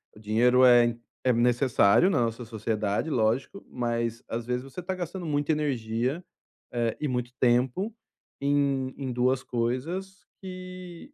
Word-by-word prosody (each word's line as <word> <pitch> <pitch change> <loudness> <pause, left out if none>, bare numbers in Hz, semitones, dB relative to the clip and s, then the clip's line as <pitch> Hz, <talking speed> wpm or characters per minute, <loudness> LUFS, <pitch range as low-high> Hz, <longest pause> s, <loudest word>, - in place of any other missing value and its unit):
O - - -14
dinheiro 120 +4 +4
é 120 -1 +7
em 120 0 -2 0.2
é 130 - +4
necessário 120 - +4
na 165 - +2
nossa 115 0 -1
sociedade, 110 0 -2
lógico, 120 - 0
mas 115 -1 -2
às 115 +1 -3
vezes 125 0 -1
você 135 +4 -9
está 185 +1 -3
gastando 180 +1 -5
muita 145 -1 0
energia, 130 0 -1 0.5
eh, 120 -2 -1
e 150 - -1
muito 125 -2 -2
tempo 125 - +2 0.5
em 140 -2 +1
em 135 -2 -4
2 125 +1 +1
coisas 160 - -3 0.2
que 185 - -9
125 Hz, 145 wpm, -27 LUFS, 120-155 Hz, 0.5 s, é